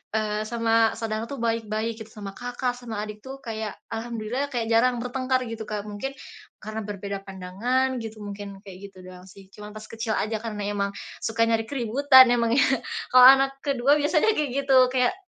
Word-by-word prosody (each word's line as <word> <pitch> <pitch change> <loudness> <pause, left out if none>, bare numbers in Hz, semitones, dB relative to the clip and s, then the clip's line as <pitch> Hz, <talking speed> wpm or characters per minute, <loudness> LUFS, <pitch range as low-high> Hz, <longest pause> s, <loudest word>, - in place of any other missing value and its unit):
eee, 215 -1 -1
sama 225 0 +2
saudara 225 0 -3
tuh 270 0 -7
baik-baik 225 -1 -1
gitu 220 - -19
sama 200 -3 -8
kakak 245 0 -3
sama 230 -4 -5
adik 210 0 -6
tuh 270 +1 -8
kayak 220 -4 -5 0.2
Alhamdulillah 230 +3 -3
kayak 230 -2 -2
jarang 235 +1 +3
bertengkar 255 +1 -1
gitu, 225 -1 -6
Kak, 210 -1 -4
mungkin 210 +7 -5 0.5
karena 215 +1 -5
berbeda 200 -1 -5
pandangan 225 +8 -1
gitu, 220 -2 -7
mungkin 200 -1 -8
kayak 195 -3 -11
gitu 190 - -21
doang 180 0 -13
sih 190 +1 -16
cuman 210 +1 -11
pas 215 0 -9
kecil 225 0 -3
aja 215 +1 -1
karena 210 -2 -4
emang 200 -1 -2 0.2
suka 225 0 -2
nyari 225 -1 +1
keributan 260 +1 +5
emang 235 -1 +2
ya 275 - +5 0.4
kalau 255 0 +8
anak 270 +1 +7
ke-2 280 +1 +3
biasanya 310 +8 +2
kayak 295 -4 0
gitu 270 -1 +4 0.2
kayak 250 +2 +2
225 Hz, 180 wpm, -25 LUFS, 210-255 Hz, 0.5 s, kalau